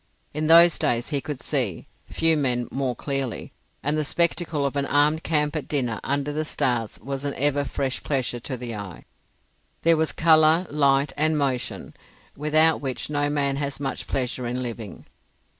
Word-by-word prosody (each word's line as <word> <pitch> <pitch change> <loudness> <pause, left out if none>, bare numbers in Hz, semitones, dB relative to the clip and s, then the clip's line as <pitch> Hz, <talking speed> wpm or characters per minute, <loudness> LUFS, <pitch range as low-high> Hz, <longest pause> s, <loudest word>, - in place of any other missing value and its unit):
In 155 +1 -1
those 170 +1 +7
days 120 0 0
he 145 -3 -1
could 145 0 -5
see—few 140 - -1
men 125 -5 0
more 130 -2 -1
clearly—and 135 +1 -4
the 155 - 0
spectacle 165 -1 0
of 140 - -2
an 140 0 0
armed 150 +2 +3
camp 150 -2 0
at 150 -4 -3
dinner 125 -7 -1
under 140 +1 -1
the 155 +1 -1
stars 120 -7 -1
was 135 +2 -4
an 140 -1 -3
ever 145 +1 +1
fresh 135 -1 -2
pleasure 130 -4 -1
to 130 +2 -5
the 120 -1 -5
eye. 100 -5 -8 0.8
There 165 0 +5
was 160 0 +1
colour, 160 +2 +4
light, 140 -1 +2
and 155 +1 +2
motion, 135 -4 -2 0.4
without 155 +2 +3
which 135 +1 -4
no 145 0 0
man 140 -2 0
has 140 -1 -3
much 135 -2 -4
pleasure 125 -1 -2
in 125 +1 -3
living. 115 -4 -7
140 Hz, 165 wpm, -24 LUFS, 130-150 Hz, 0.8 s, those